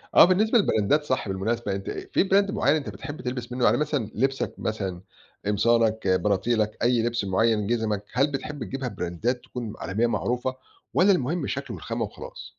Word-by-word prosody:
آه - - +10
بالنسبة 215 +6 +3
للبراندات 145 - +2
صح 130 -7 -1
بالمناسبة، 100 +3 -1
أنت 100 0 -5
أ - - -5
في 190 - +2
Brand 200 +1 +4
معين 145 -4 +2
أنت 140 -8 -3
بتحب 145 +9 -7
تلبس 125 -1 -4
منه؟ 125 0 0
يعني - - +4
مثلًا 145 -5 0
لِبسك 135 +3 0
مثلًا، 95 -5 -3 0.4
قمصانك 110 0 +2
بناطيلك، 105 +3 +1
أي 120 -1 +3
لِبس 120 -3 -1
مُعين، 105 +2 +2
جِزمك، 110 -3 0
هل 140 +4 +2
بتحب 140 0 -4
تجيبها 130 +2 -4
براندات 110 +6 -2
تكون 120 -4 -6
عالمية 105 +8 0
معروفة؟ 125 +2 -1 0.4
والّا 190 +4 +5
المُهم 165 -1 0
الشكل 140 -3 -4
والخامة 115 0 -3
وخلاص؟ 105 - -10
120 Hz, 170 wpm, -25 LUFS, 105-140 Hz, 0.4 s, آه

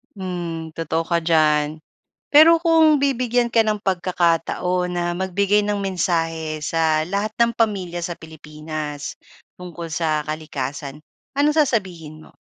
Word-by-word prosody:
Hmm, 175 -4 -5
totoo 165 0 -2
ka 170 0 0
diyan. 155 -2 +2 0.5
Pero 320 +3 +7
kung 320 -3 +4
bibigyan 245 -3 +1
ka 230 -1 +4
ng 215 -1 0
pagkakataon 180 -1 0
na 175 -1 -2
magbigay 200 +3 +1
ng 205 -1 -1
mensahe 165 -4 -1
sa 160 -1 +1
lahat 200 +3 -2
ng 235 0 +4
pamilya 190 -6 -1
sa 175 0 -4
Pilipinas, 155 -1 -7 0.4
tungkol 175 -2 -7
sa 155 -2 0
kalikasan, 145 -2 -5 0.4
anong 295 +2 +2
sasabihin 180 - -1
mo? - - -23
175 Hz, 125 wpm, -21 LUFS, 155-205 Hz, 0.5 s, Pero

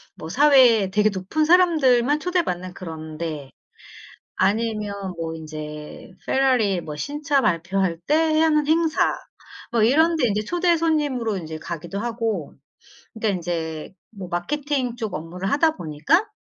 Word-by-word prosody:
뭐 160 - -8
사회에 250 - +5
되게 210 +2 +2
높은 200 +11 -1
사람들만 300 -6 +4
초대받는 305 - -2
그런 160 -3 -8
데 150 -5 -5 0.8
아니면 210 +1 0 0.2
뭐 165 -1 -4
인제 155 +1 -8
페라리 250 -8 +2
뭐 155 -3 -7
신차 285 - -1
발표할 175 -1 0
때 315 +1 +3
하는 305 -2 +3
행사 320 0 +2 0.6
뭐 230 -2 +3
이런데 315 +3 +3
인제 210 +1 -1
초대 350 +3 +2
손님으로 290 -9 0
인제 160 -3 -6
가기도 170 +4 -6
하고 225 -7 -3 0.6
근데 220 -1 -2
인제 165 -4 -4 0.2
뭐 195 -4 -8
마케팅 260 +7 -2
쪽 220 -3 -4
업무를 175 +5 -4
하다 315 +2 +3
보니까 175 - +1
220 Hz, 275 characters per minute, -23 LUFS, -, 0.8 s, 사회에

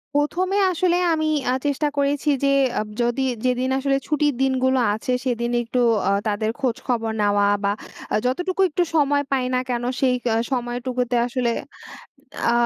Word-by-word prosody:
১ম 320 +6 +1
এ - - +3
আসলে 350 +1 +2 0.2
আমি 315 0 0 0.3
আ - - +2
চেষ্টা 290 +1 +1
করেছি 285 +1 +1
যে, - - +4 0.3
আব 215 - -3
যদি 240 +3 0 0.2
যেদিন 255 +1 +1
আসলে 275 0 +1
ছুটির 295 -2 +1
দিনগুলো 260 -1 +2
আছে, 220 +4 -3
সেদিন 240 -1 -1
একটু 240 +2 -2 0.3
আ - - +3 0.2
তাদের 215 +1 0
খোঁজখবর 240 -3 -1
নেওয়া 205 0 +3 0.2
বা 200 - +2 0.4
আ - - +4
যতটুকু 355 +9 0
একটু 350 +3 +1
সময় 285 -1 +3
পাই 260 -2 +1
না 250 - +2
কেন, 240 -1 -1 0.2
সেই 255 -2 +3
কা 230 - +2 0.2
সময়টুকুতে 245 0 -2
আসলে 245 -1 -1 1.0
আ - - +2
255 Hz, 160 wpm, -22 LUFS, 240-285 Hz, 1.0 s, যে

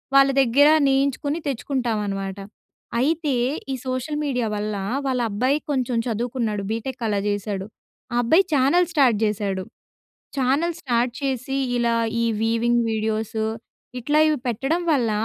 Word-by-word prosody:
వాళ్ళ 275 0 +7
దగ్గర 270 +3 +5 0.2
నేయించుకుని 280 +3 +1
తెచ్చుకుంటామనమాట. 215 -8 -2 0.6
అయితే, 300 +2 +1 0.4
ఈ - - -1
సోషల్ 255 +4 -2
మీడియా 250 -5 0
వల్ల, 210 0 -2 0.3
వాళ్ళ 255 -2 0
అబ్బాయి 255 +8 +1
కొంచెం 255 -3 0
చదువుకున్నాడు 230 -2 -2
బీటెక్ 245 +3 -4
అలా 205 -2 0
జేశాడు. 205 -1 -2 0.5
ఆ - - -1
అబ్బాయి 320 +11 +5
ఛానెల్ 290 +6 +4
స్టార్ట్ 265 -8 +4
చేశాడు. 200 -2 -1 0.8
ఛానెల్ 280 +7 +1
స్టార్ట్ 240 -2 +1
చేసి, 270 0 -2 0.2
ఇలా 235 -1 +2 0.3
ఈ - - +2 0.2
వీవింగ్ 235 +1 +2
వీడియోసు 220 0 -1 0.5
ఇట్లా 295 +5 +1
ఇవి 310 -1 +2
పెట్టడం 270 +8 0
వల్ల 245 -6 +2
245 Hz, 125 wpm, -23 LUFS, 220-275 Hz, 0.8 s, వాళ్ళ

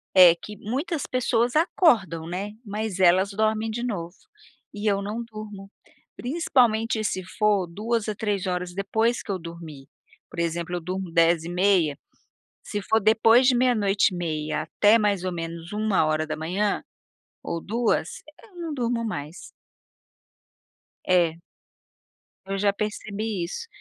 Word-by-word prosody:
é 180 -2 +9
que 210 +3 -10
muitas 280 - -3
pessoas 240 0 +1
acordam, 220 - +2
né. 195 +4 -4
Mas 210 -1 -4
elas 185 +2 +4
dormem 220 +2 0
de 235 +2 -3
novo, 175 -7 -4 0.6
e 210 +1 -1
eu 200 0 +1
não 215 +4 -4
durmo. 215 -3 -9 0.4
Principalmente 235 -6 +1
se 185 -2 -2
for 200 0 +1
2 220 +5 -2
a 215 - -2
3 205 -3 -2
horas 180 0 -2
depois 220 +5 0
que 205 - -5
eu 190 - -2
dormi. 165 -5 -10 0.4
Por - - -8
exemplo, 170 +1 -2
eu 175 - -3
durmo 185 +1 -4
22:30, 170 -1 +2 0.7
se 205 - -4
for 220 +3 +2
depois 225 +4 +5
de 260 - +5
meia-noite 210 -6 +2
e - - -4
meia, 155 -3 -2
até 205 +7 +4
mais 205 -4 +1
ou 185 - -1
menos 165 +1 -6
1h00 170 -1 0 0.6
ou 170 -1 -3
2h, 225 -5 0 0.3
eu 430 -5 -18
não 330 -2 -4
durmo 240 -3 -1
mais. 155 -5 -6 1.6
É. 175 -3 +3 1.1
Eu 195 0 -3
já 200 +1 +3
percebi 210 -1 -3
isso, 325 - -6
200 Hz, 135 wpm, -25 LUFS, 175-220 Hz, 1.6 s, é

